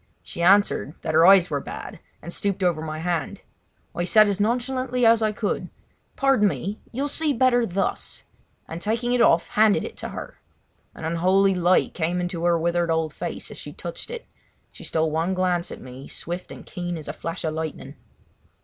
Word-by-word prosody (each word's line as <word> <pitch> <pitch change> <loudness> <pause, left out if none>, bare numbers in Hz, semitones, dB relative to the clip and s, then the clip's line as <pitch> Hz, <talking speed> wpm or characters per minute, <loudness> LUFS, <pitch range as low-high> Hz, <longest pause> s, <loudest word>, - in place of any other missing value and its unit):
She - - -7
answered 190 -4 +3
that 160 - -2
her 165 +2 +6
eyes 190 -2 +6
were 145 - 0
bad, - - -8 0.2
and 170 - -6
stooped 200 -1 -1
over 175 -3 +1
my 155 -1 -4
hand. 165 -2 -3 0.5
I 175 - -2
said 215 +4 +6
as 200 -1 -1
nonchalantly 250 +2 0
as 230 0 +5
I 215 -1 +2
could: 210 0 -2 0.5
"Pardon 270 -7 +3
me! 200 +2 -3
You 260 +4 -2
will - - 0
see 300 +1 +1
better 245 -2 +3
thus!" 190 +2 -2 0.4
and 165 +1 -7
taking 230 +4 0
it 250 - +3
off 170 -7 +4
handed 215 -1 +3
it - - -7
to - - -5
her. - - -8 0.6
An - - -7
unholy 185 +4 +3
light 180 0 +2
came 175 +1 -1
into 175 -1 -3
her 170 -1 +4
withered 170 +1 0
old 160 -1 0
face, - - -5
as - - -9
she - - -8
touched - - -7
it. 480 0 -7 0.5
She - - -12
stole 160 -1 0
one 165 +4 0
glance 180 -2 0
at - - -7
me 130 +2 -10
swift 175 +2 -6
and - - -10
keen 175 -1 -4
as 155 - -9
a - - -4
flash 165 +1 -5
of 160 -1 -1
lightning. 160 0 -5
180 Hz, 195 wpm, -24 LUFS, 165-215 Hz, 0.6 s, her